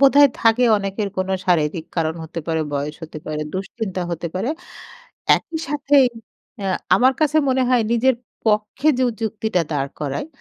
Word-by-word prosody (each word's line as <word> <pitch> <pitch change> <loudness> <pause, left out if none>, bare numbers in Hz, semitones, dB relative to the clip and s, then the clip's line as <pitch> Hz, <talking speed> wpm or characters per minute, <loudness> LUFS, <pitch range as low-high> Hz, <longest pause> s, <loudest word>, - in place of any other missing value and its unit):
বোধহয় 280 0 +7
থাকে 230 +2 +4
অনেকের 200 +1 -2
কোনো 190 +1 0
শারীরিক 160 -2 +1
কারণ 160 -1 0
হতে 165 +1 -6
পারে, 160 -1 0
বয়স 145 +1 -2
হতে 155 -1 -8
পারে, 155 0 -3
দুশ্চিন্তা 190 0 -3
হতে 170 +1 -3
পারে। 200 +8 -1 0.9
একই 325 - -6
সাথেই 285 -2 +4 0.5
অ্যা 195 -1 -1 0.3
আমার 260 +2 +4
কাছে 305 0 +2
মনে 260 0 +2
হয় 245 -2 +4
নিজের 255 +3 +3 0.3
পক্ষে 215 +7 +1
জু 255 - +3 0.2
যুক্তিটা 220 -4 0
দাঁড় 140 -1 -1
করায় 145 - -3
205 Hz, 155 wpm, -21 LUFS, 165-255 Hz, 0.9 s, বোধহয়